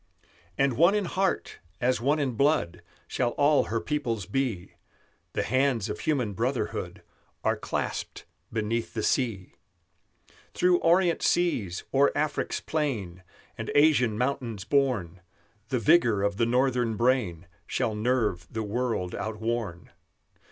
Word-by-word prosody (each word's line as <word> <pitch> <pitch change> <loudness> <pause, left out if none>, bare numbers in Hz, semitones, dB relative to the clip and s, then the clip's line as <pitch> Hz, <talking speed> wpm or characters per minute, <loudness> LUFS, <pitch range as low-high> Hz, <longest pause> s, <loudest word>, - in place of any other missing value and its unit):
"And 135 -4 +2
one 175 +7 +5
in 205 -2 0
heart, 190 +2 -1 0.2
as 125 0 +1
one 145 +5 +2
in 140 -4 0
blood, 120 - +1 0.3
Shall 120 -2 -1
all 145 +1 +4
her 115 - -1
peoples 120 -8 -2
be; 110 -5 -2 0.6
The - - 0
hands 130 -3 +1
of 105 - -4
human 130 -9 0
brotherhood - - -3 0.4
Are - - +2
clasped - - -4 0.3
beneath 115 +1 -2
the 110 - -2
sea. 115 -9 -1 1.0
"Through 180 -1 +3
Orient 170 +1 +3
seas, 120 - +1
o'er 140 +1 +4
Afric's 150 +1 -1
plain 110 - -3 0.4
And - - -4
Asian 140 -7 +4
mountains 125 -5 -2
borne, 105 - 0 0.5
The 130 - +1
vigor 120 -7 +4
of 100 -1 0
the 115 - +2
Northern 125 -2 +1
brain 110 -8 +1 0.2
Shall 110 - -1
nerve 105 -6 0
the 110 0 -3
world 110 -4 -2
outworn. 110 -3 -4
120 Hz, 130 wpm, -27 LUFS, 105-140 Hz, 1.0 s, one